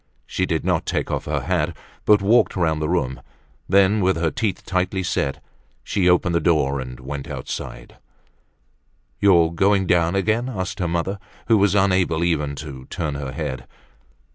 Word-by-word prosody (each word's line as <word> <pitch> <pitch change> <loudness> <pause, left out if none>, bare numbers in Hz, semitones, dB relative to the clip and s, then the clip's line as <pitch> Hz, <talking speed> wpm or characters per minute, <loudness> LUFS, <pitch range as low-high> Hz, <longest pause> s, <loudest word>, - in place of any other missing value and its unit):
She - - -2
did - - -1
not - - 0
take - - -1
off - - -2
her - - -1
hat 85 -2 -1 0.3
but 105 -1 +5
walked 115 +5 +3
round 80 -4 0
the 75 - -1
room; 65 -8 -1 0.5
then 100 +2 +4
with 95 0 +2
her 80 -1 0
teeth 105 -5 -2
tightly 95 +1 -1
set, 70 -4 -2 0.4
she 90 -3 +1
opened 90 0 +3
the 85 - +3
door 75 -4 +1
and 65 -1 -7
went 70 +1 -6
out. - - -4 1.6
"You 100 -3 +5
are 80 - 0
doing 95 +2 +2
down 85 0 +2
again?" 110 +6 +1
asked 95 -5 -4
her 90 - 0
mother, 85 +4 -2 0.3
who 115 - +4
was 100 0 +3
unable 95 -4 +2
even 75 -4 0
to 70 -3 -8
turn 75 0 -3
her 70 -2 -5
head. 75 -3 -5
85 Hz, 170 wpm, -22 LUFS, 75-95 Hz, 1.6 s, but